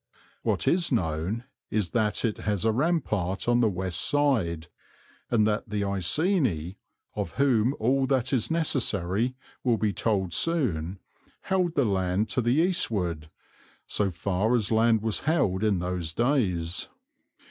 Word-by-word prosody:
What - - -1
is 170 -2 +2
known 90 +1 -1 0.3
is 105 -6 -1
that 110 0 0
it 110 - -2
has 105 -1 -1
a 110 - +4
rampart 110 - -1
on 120 0 +3
the 115 -3 +3
west 90 -2 -2
side, 110 - +1 0.6
and 110 -3 +3
that 105 +1 -1
the 105 -1 -1
Iceni, 100 - 0 0.4
of 85 - -3
whom 130 -2 +2
all 130 +4 +2
that 130 -1 0
is 125 -5 +1
necessary 125 - 0 0.3
will 120 -3 +2
be 105 -1 0
told 95 -6 -1
soon, 100 - +1 0.4
held 180 -3 0
the 140 - +3
land 95 +1 0
to 125 - 0
the 120 +2 +2
eastward, 100 - 0 0.6
so 100 -2 0
far 100 +6 0
as 110 -3 0
land 110 -1 +3
was 110 -2 0
held 110 - +1
in 105 -3 +2
those 90 -2 -3
days. 95 - 0
110 Hz, 145 wpm, -27 LUFS, 90-130 Hz, 0.6 s, a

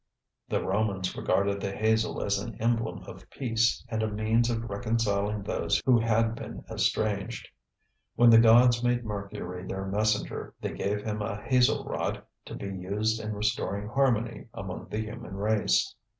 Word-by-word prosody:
The - - 0
Romans 95 -1 -1
regarded 100 0 0
the 100 - -2
hazel 110 +2 +1
as 100 -1 +1
an 100 - -7
emblem 115 0 0
of - - -12
peace 115 -3 0
and 110 -2 -2
a 110 - +1
means 110 +3 +1
of 115 0 -2
reconciling 105 -1 -1
those 100 - 0
who 125 -3 +5
had 115 0 +2
been - - -8
estranged. 110 +2 -1 0.7
When 120 -1 +6
the 115 - +9
gods 120 +1 +6
made 120 -1 +1
Mercury 100 -3 -5
their 95 0 -4
messenger 105 +2 -1
they - - -3
gave 105 +1 -2
him 105 -1 -3
a 105 0 -4
hazel 125 -1 +3
rod - - -3 0.2
to - - -7
be - - -6
used 105 +4 -1
in 110 0 -4
restoring 105 -1 -1
harmony 120 -3 0
among 95 -2 -6
the 110 - -2
human 105 -3 -8
race. 105 +2 +1
110 Hz, 160 wpm, -28 LUFS, 100-115 Hz, 0.7 s, the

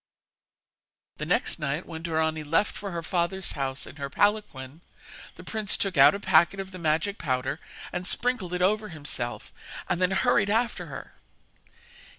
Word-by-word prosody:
The - - -4
next - - +1
night, 150 +3 -2
when 160 -1 -7
Dorani 160 -1 0
left 165 +7 +1
for 200 - -5
her 170 -2 -4
father's 175 +2 -1
house 135 -2 -3
in - - -11
her 140 -1 -4
palanquin, 165 -7 0 0.5
the - - -11
prince 215 -2 0
took 195 -3 -1
out 140 +7 +7
a - - -4
packet 175 0 +4
of 190 0 -5
the 185 - -8
magic 165 +5 0
powder 130 +4 -1 0.3
and 180 0 -2
sprinkled 230 -8 +1
it 180 - 0
over 210 +3 +2
himself, 145 -6 -5 0.3
and 180 -1 -1
then 180 - +4
hurried 200 +1 +3
after 230 +3 0
her. - - -8
175 Hz, 160 wpm, -27 LUFS, 155-200 Hz, 0.5 s, out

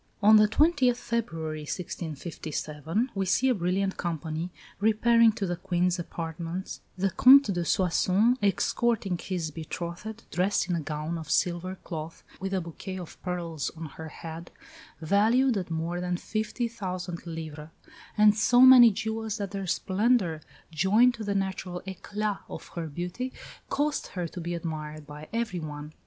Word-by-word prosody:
On 215 +1 +8
the 210 0 +6
20th 260 0 +3
February, 165 -12 -3
1657, 160 - -4
we 195 -1 -1
see 260 +8 +3
a - - +4
brilliant 190 0 -1
company 165 0 -3 0.3
repairing 225 +2 +5
to 210 -2 -3
the 175 -1 -1
Queen's 180 0 0
apartments, 165 +2 -5 0.2
"the 195 +1 +1
Comte 260 -2 +7
de 175 -1 -1
Soissons 185 +7 +3
escorting 205 0 +1
his 170 -5 -3
betrothed, 170 +7 -6
dressed 185 +2 +1
in 180 - 0
a - - -1
gown 155 +2 -4
of 160 - -9
silver 180 0 0
cloth, 160 -1 -7 0.2
with 195 0 -3
a 190 - +1
bouquet 175 +3 -7
of 175 -3 -9
pearls 170 -5 -3
on 165 - -6
her 160 +2 -8
head, 165 +2 -8 0.5
valued 225 +9 +3
at 185 -4 -3
more 165 +2 -2
than 180 0 -1
50,000 190 -6 -4
livres, 160 -2 -7 0.5
and 210 0 +6
so 245 +3 +4
many 255 -2 +10
jewels 220 0 -3
that 200 -3 -4
their 195 -1 -4
splendour, 190 -3 +1 0.3
joined 210 +9 +4
to 230 -2 -7
the 200 -1 -2
natural 190 -2 -2
éclat 205 +2 -3
of - - -8
her 170 -2 -5
beauty, 180 - -4 0.4
caused 295 +1 0
her 180 -2 -4
to 175 - -8
be 175 +1 -3
admired 155 -2 -5
by 150 +1 -10
everyone. 155 -10 -4
185 Hz, 150 wpm, -28 LUFS, 165-215 Hz, 0.5 s, many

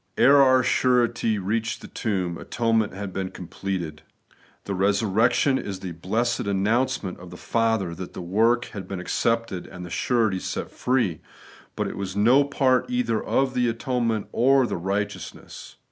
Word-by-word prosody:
^ - - -47 0.2
Ere 140 +1 +7
our 130 -1 +5
surety 120 -3 +2
reached 110 +4 -2
the - - -10
tomb, 95 -6 -2
atonement 115 +2 0
had 100 -1 -6
been 95 -1 -3
completed. 90 -3 -5 0.6
The 100 - -4
resurrection 105 +7 +2
is 95 -2 -5
the 95 - -5
blessed 110 +8 -1
announcement 105 +1 0
of 90 0 -11
the 90 - -10
Father 115 -6 0
that 90 +1 -8
the - - -6
work 115 +7 +2
had 95 -4 -6
been 95 -1 -5
accepted 115 +1 -1
and 90 -1 -9
the 85 - -10
surety 110 -5 +1
set - - -4
free; 120 -11 0 0.5
but - - -1
it - - -6
was 95 -1 -4
no 120 +7 +5
part 135 - +1
either 250 - 0
of 135 -1 +1
the 125 -1 +2
atonement 115 -2 -1
or 135 +1 +4
the - - -3
righteousness. 100 +3 -5
110 Hz, 160 wpm, -24 LUFS, 95-120 Hz, 0.6 s, Ere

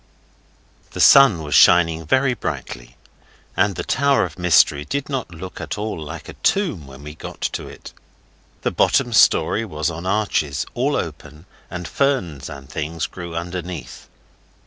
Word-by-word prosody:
The - - -7
sun 135 - +7
was 75 - -4
shining 80 -2 +5
very 130 - +2
brightly, - - -6 0.6
and 95 +1 +1
the - - -4
Tower 140 0 +2
of 85 0 -10
Mystery 80 -4 +4
did 140 - -4
not 135 -7 -3
look 90 +2 -9
at - - -5
all 105 -5 -4
like 80 +2 -8
a - - -8
tomb 160 - -1
when 65 +1 -13
we 75 0 -8
got 80 - -10
to - - -3
it. - - -12 0.7
The - - 0
bottom 120 -3 +2
Storey 110 +1 +4
was 80 -6 -3
on 85 +3 -6
arches, 95 - 0
all - - 0
open, 75 +3 -6 0.2
and 90 -2 -6
ferns 95 - -1
and 70 -1 -10
things 80 +1 -4
grew 85 -2 -8
underneath. 85 -5 -6
85 Hz, 155 wpm, -21 LUFS, 75-105 Hz, 0.7 s, sun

